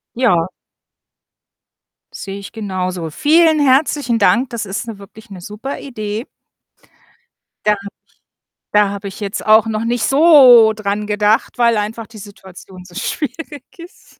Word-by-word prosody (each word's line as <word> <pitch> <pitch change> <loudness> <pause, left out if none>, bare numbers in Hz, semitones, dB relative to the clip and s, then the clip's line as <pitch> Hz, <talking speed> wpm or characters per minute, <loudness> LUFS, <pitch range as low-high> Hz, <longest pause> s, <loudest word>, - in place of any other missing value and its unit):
Ja. 185 -9 +1 1.6
Sehe 195 0 -8
ich 200 - -10
genauso. 185 -6 -4
Vielen 315 - +3
herzlichen 275 -3 +1
Dank, 235 +4 +2
das 235 -3 -5
ist 200 +4 -5
'ne 225 - -7
wirklich 210 +3 -15
'ne 190 -3 -10
super 210 +9 -7
Idee. 215 -3 -6 1.4
Da 210 - +4
habe - - -12
ich - - -6 0.8
da 210 -1 +3
habe 200 0 -6
ich 195 - -10
jetzt 200 +1 -5
auch 220 +1 +5
noch 220 0 -3
nicht 235 -1 -1
so 265 -7 +6
dran 210 0 -4
gedacht, 210 +2 0
weil 235 -2 +2
einfach 215 +2 -4
die 225 - -15
Situation 190 -2 -13
so 180 -1 -17
schwierig 295 0 -5 0.2
ist 340 +1 -16
215 Hz, 145 wpm, -17 LUFS, 200-245 Hz, 1.6 s, so